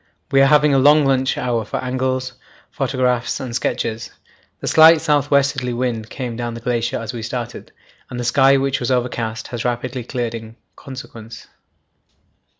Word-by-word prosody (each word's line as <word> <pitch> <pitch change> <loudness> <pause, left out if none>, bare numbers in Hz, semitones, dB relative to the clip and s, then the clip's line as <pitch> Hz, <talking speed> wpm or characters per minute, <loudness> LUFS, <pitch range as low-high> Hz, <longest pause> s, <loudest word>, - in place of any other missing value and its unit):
We 135 - +5
are 135 - +6
having 150 0 +4
a 135 - +4
long 145 +2 +5
lunch 130 -1 +1
hour 120 -3 -1
for 105 - -4
angles, 130 0 -2 0.4
photographs, 125 -2 -1
and 125 -3 -5
sketches. 115 -2 -2 0.5
The - - -7
slight 160 +1 +7
south 150 -3 +1
westerly 140 -3 +1
wind 120 -3 -2
came 125 -4 -5
down 120 0 -4
the - - -6
glacier 120 0 -1
as 115 0 -5
we 120 - -5
started, 120 +1 -6 0.4
and 125 - -6
the - - -2
sky, 135 +3 +4
which 135 0 0
was 120 - -2
overcast, 120 -3 -2
has 120 -2 -4
rapidly 125 +1 -3
cleared 120 -1 -3
in 115 -1 -8 0.2
consequence. 115 -4 -10
125 Hz, 165 wpm, -20 LUFS, 120-135 Hz, 0.5 s, slight